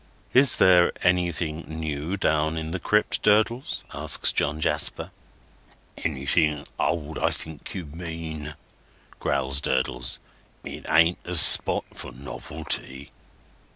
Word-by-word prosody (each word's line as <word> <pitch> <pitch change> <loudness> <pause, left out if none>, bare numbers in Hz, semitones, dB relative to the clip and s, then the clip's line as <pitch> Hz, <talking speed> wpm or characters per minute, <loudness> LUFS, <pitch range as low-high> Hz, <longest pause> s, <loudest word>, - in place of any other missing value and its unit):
"Is 135 +1 +5
there 90 -1 +5
anything 85 -3 0
new 80 +3 -4
down 80 -2 0
in 80 0 -4
the 95 - -3
crypt, 105 +4 +1
Durdles?" 110 +4 +1
asks - - +2
John 75 +2 0
Jasper. 75 -1 +1 0.9
"Anything 75 0 0
old, 80 -2 -2
I - - +2
think 80 +4 -6
you 90 -3 -5
mean," 80 -1 -7 0.6
growls 70 0 0
Durdles. - - -1 0.5
"It - - -8
ain't 85 +2 +4
a 90 - -4
spot 75 - +5
for - - -8
novelty." 70 0 -4
80 Hz, 115 wpm, -25 LUFS, 75-85 Hz, 0.9 s, Is